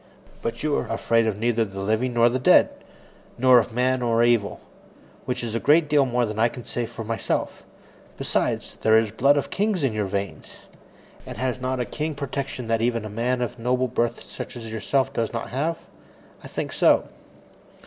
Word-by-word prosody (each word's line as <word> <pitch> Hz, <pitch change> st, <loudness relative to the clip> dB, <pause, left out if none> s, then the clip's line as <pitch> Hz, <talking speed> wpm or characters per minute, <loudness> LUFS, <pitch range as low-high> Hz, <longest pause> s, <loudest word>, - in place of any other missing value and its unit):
But 115 Hz, +3 st, -4 dB
you 150 Hz, -1 st, +1 dB
are -, -, -2 dB
afraid 115 Hz, 0 st, +1 dB
of 105 Hz, -3 st, -1 dB
neither 115 Hz, +1 st, +1 dB
the 95 Hz, -2 st, -6 dB
living 110 Hz, +5 st, 0 dB
nor 120 Hz, 0 st, +5 dB
the 125 Hz, +2 st, 0 dB
dead, 130 Hz, -, +5 dB, 0.7 s
nor 130 Hz, 0 st, +6 dB
of 120 Hz, -, -2 dB
man 130 Hz, +2 st, +1 dB
nor 120 Hz, -1 st, +2 dB
devil 115 Hz, -4 st, +1 dB, 0.7 s
which 125 Hz, -1 st, -2 dB
is 115 Hz, -2 st, -3 dB
a 115 Hz, -, 0 dB
great 150 Hz, +4 st, +4 dB
deal 145 Hz, -2 st, +3 dB
more 125 Hz, 0 st, +1 dB
than 105 Hz, 0 st, -5 dB
I 115 Hz, -, +5 dB
can 120 Hz, 0 st, -9 dB
say 120 Hz, -1 st, -3 dB
for 115 Hz, -, -7 dB
myself. 115 Hz, +1 st, -2 dB, 0.6 s
Besides, -, -, -2 dB
there 110 Hz, 0 st, +5 dB
is 110 Hz, -1 st, +2 dB
the -, -, -21 dB
blood 140 Hz, +5 st, +4 dB
of 140 Hz, -, -2 dB
kings 200 Hz, -5 st, 0 dB
in 130 Hz, -5 st, +1 dB
your 105 Hz, -2 st, -1 dB
veins. 100 Hz, 0 st, -5 dB, 0.6 s
And -, -, -9 dB
has 130 Hz, -1 st, -2 dB
not 130 Hz, 0 st, -1 dB
a 125 Hz, -, 0 dB
king 155 Hz, +3 st, -4 dB
protection 135 Hz, -3 st, -4 dB
that 115 Hz, 0 st, +1 dB
even 115 Hz, -2 st, 0 dB
a -, -, -5 dB
man 125 Hz, +3 st, -1 dB
of 120 Hz, -, -5 dB
noble 125 Hz, +2 st, +1 dB
blood 120 Hz, -1 st, -1 dB
such -, -, -8 dB
as 115 Hz, -2 st, -7 dB
myself 135 Hz, +4 st, 0 dB
does 115 Hz, -4 st, -1 dB
not 115 Hz, -, -4 dB
have? 155 Hz, +6 st, -1 dB, 0.7 s
I -, -, -8 dB
think -, -, -4 dB
so. -, -, +4 dB
120 Hz, 200 wpm, -24 LUFS, 115-130 Hz, 0.7 s, nor